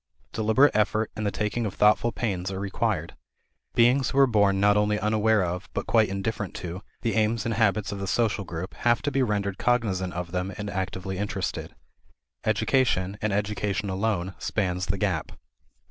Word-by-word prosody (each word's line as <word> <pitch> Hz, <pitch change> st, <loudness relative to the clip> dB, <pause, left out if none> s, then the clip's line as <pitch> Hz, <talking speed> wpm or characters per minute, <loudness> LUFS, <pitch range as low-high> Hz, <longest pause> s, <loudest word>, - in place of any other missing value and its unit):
Deliberate 110 Hz, +6 st, +3 dB
effort 110 Hz, +1 st, +1 dB
and 110 Hz, -1 st, -2 dB
the -, -, 0 dB
taking 105 Hz, +3 st, -2 dB
of 95 Hz, -, -6 dB
thoughtful 105 Hz, +3 st, +4 dB
pains 95 Hz, -7 st, -2 dB
are 95 Hz, -1 st, -4 dB
required. 100 Hz, -1 st, -1 dB, 0.6 s
Beings 125 Hz, +3 st, +4 dB
who 135 Hz, -, -3 dB
are 140 Hz, -, +8 dB
born 100 Hz, -5 st, +3 dB
not 105 Hz, +1 st, +4 dB
only 105 Hz, 0 st, +2 dB
unaware 110 Hz, -1 st, +2 dB
of, 90 Hz, +2 st, -4 dB
but -, -, -2 dB
quite 110 Hz, -2 st, +3 dB
indifferent 100 Hz, +1 st, -3 dB
to, 90 Hz, +2 st, -6 dB, 0.2 s
the 115 Hz, -, 0 dB
aims 110 Hz, 0 st, +1 dB
and 115 Hz, -, 0 dB
habits 105 Hz, -2 st, +1 dB
of 100 Hz, -, -5 dB
the 100 Hz, -, -4 dB
social 110 Hz, -1 st, +1 dB
group 90 Hz, 0 st, -6 dB
have 120 Hz, -1 st, +2 dB
to 145 Hz, -, 0 dB
be 135 Hz, 0 st, +1 dB
rendered 100 Hz, -5 st, -1 dB
cognizant 100 Hz, -7 st, 0 dB
of 85 Hz, 0 st, -5 dB
them 90 Hz, +1 st, -2 dB
and 105 Hz, 0 st, -4 dB
actively 95 Hz, 0 st, -3 dB
interested. 105 Hz, 0 st, -3 dB, 0.7 s
Education, 110 Hz, -3 st, +1 dB
and 110 Hz, -, 0 dB
education 100 Hz, 0 st, -1 dB
alone, 95 Hz, -2 st, -1 dB
spans 90 Hz, -3 st, -1 dB
the 100 Hz, +3 st, 0 dB
gap. 95 Hz, -6 st, -1 dB
105 Hz, 175 wpm, -26 LUFS, 95-110 Hz, 0.7 s, are